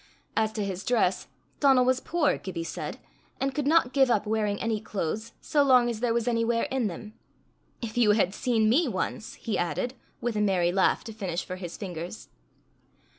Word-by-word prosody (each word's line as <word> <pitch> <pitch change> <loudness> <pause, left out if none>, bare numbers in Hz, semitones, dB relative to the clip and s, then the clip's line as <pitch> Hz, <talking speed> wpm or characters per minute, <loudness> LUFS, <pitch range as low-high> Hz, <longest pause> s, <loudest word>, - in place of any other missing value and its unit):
As 220 -1 +2
to 210 -2 -2
his 190 0 -4
dress, 210 -7 +1 0.3
Donal 265 -3 +5
was 255 0 +3
poor, 325 +1 +1
Gibbie 180 -4 -5
said, 165 - -5 0.4
and 270 0 0
could 290 0 -1
not 310 -5 +3
give 270 -2 +4
up 215 -3 +2
wearing 210 -1 0
any 225 -2 -1
clothes 215 +2 -3
so 295 - +2
long 250 -3 +5
as 220 - -5
there 240 0 +1
was 235 0 0
any 230 -1 +2
wear 230 0 +1
in 260 -4 +1
them. 210 +4 -7 0.7
"If 230 +1 -3
you 210 -3 +5
had 200 -3 +2
seen 230 -3 +1
me 285 +9 +4
once!" 215 0 -3
he 225 - -3
added, 210 +8 -1 0.3
with 240 -2 -2
a 210 - +1
merry 185 -4 +2
laugh 190 +1 +2
to 225 - -8
finish 185 -5 -3
for 185 - -6
his 175 -2 -7
fingers. 175 0 -7
220 Hz, 195 wpm, -27 LUFS, 195-245 Hz, 0.7 s, Donal